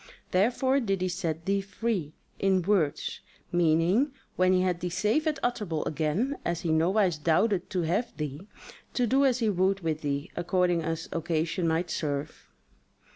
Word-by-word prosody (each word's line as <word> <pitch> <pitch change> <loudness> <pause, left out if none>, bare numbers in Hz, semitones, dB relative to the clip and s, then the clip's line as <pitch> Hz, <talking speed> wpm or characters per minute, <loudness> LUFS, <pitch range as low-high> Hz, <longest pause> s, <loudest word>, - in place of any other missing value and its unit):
Therefore 250 +8 +2
did 195 -7 -1
he 185 - 0
set 165 -3 -3
thee 195 0 +1
free 195 -6 -3 0.2
(in 190 -2 +2
words) 180 -6 0 0.3
meaning, 175 - +3 0.2
when 185 0 +3
he 185 0 +4
had 180 -2 0
thee 180 0 -2
safe 210 - +1
at 305 - +1
Utterbol 210 -10 -1
again 165 - -1
(as 170 -1 -2
he 165 - -1
nowise 175 +1 +2
doubted 175 +5 +2
to 180 -2 -1
have 185 +9 -1
thee) 150 +4 -5 0.5
to 250 - +2
do 270 +4 +3
as 255 -3 +3
he - - +3
would 190 +1 +1
with 160 -2 -2
thee, 140 0 -2
according 175 0 +1
as 165 0 -3
occasion 165 +1 -1
might 165 +2 0
serve. 145 0 -3
180 Hz, 165 wpm, -28 LUFS, 160-205 Hz, 0.5 s, he